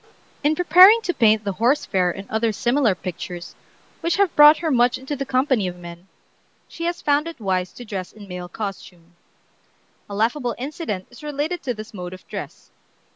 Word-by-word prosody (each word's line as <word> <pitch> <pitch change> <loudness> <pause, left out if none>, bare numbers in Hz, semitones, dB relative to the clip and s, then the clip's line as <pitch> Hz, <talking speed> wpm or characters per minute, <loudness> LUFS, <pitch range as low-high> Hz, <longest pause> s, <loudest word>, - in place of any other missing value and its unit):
In 300 +2 +2
preparing 365 +6 +7
to 355 - -1
paint 220 -5 +3
the 200 - -2
"Horse 240 +9 +1
Fair" 185 -2 +1
and 195 +3 -6
other 220 +1 0
similar 240 -1 +1
pictures, 180 -1 -7 0.5
which 335 0 0
have 395 -3 +1
brought 295 +1 +8
her 325 -2 -2
much 245 -1 +3
into 265 +3 -5
the 275 -1 -5
company 255 -6 +1
of 180 0 -6
men, 175 +1 -11 0.6
she 335 - -7
has 345 0 -3
found 290 +2 +2
it 335 -5 -8
wise 185 -3 -1
to 245 - -10
dress 190 -4 -5
in 210 -2 -13
male 180 -1 -7
costume. 180 -4 -8 1.0
A 200 - -6
laughable 240 +3 0
incident 270 - -5
is 245 - -14
related 300 +3 -4
of 245 -3 -2
this 215 +2 -9
mode 180 -2 -7
of 185 - -18
dress. - - -8
235 Hz, 185 wpm, -22 LUFS, 190-295 Hz, 1.0 s, brought